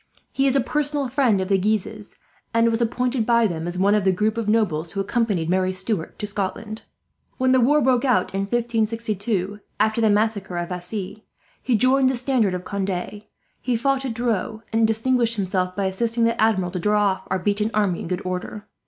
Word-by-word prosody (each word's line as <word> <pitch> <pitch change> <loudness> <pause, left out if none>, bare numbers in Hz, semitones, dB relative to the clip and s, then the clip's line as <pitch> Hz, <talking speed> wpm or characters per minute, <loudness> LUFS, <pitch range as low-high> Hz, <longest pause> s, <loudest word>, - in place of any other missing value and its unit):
He 275 0 +1
is 270 - +2
a 275 - +4
personal 290 +1 0
friend 245 -6 +2
of 185 - -2
the 195 0 +2
Guises, 210 +1 -2 0.4
and 230 0 +4
was 225 +1 -1
appointed 245 +1 0
by 235 +1 +3
them 170 -4 -2
as 175 +1 -4
one 200 +2 +3
of 210 -2 +2
the 190 - +3
group 210 +4 0
of 230 -2 -2
nobles 170 -8 0
who 195 - -3
accompanied 200 -4 0
Marie 185 +1 +1
Stuart 185 -2 -3
to - - -4
Scotland. 210 +2 -4 0.6
"When 260 -1 +2
the 260 - +5
war 290 +4 +4
broke 250 -1 +2
out 245 -11 +1
in 195 - -1
1562, 220 -3 -1 0.2
after 220 +2 +2
the 220 - +4
massacre 205 -3 0
of 175 0 -3
Vassy, 190 +3 -4 0.4
he 250 - +1
joined 260 +4 +4
the 260 - -1
standard 240 -7 +1
of 180 - -6
Conde. 200 +1 -4 0.4
He 245 -2 0
fought 270 +2 0
at 250 -4 -3
Dreux, 225 -2 -2
and 225 0 +3
distinguished 230 +1 +1
himself 185 -2 -1
by 200 - -1
assisting 230 +5 0
the 230 0 +1
Admiral 190 -5 +2
to 180 - -3
draw 210 +3 +2
off 195 -2 -1
our 190 - +1
beaten 205 +3 0
army 200 -5 +1
in - - -6
good 180 +2 -3
order. 185 +3 -5
215 Hz, 205 wpm, -23 LUFS, 190-235 Hz, 0.6 s, the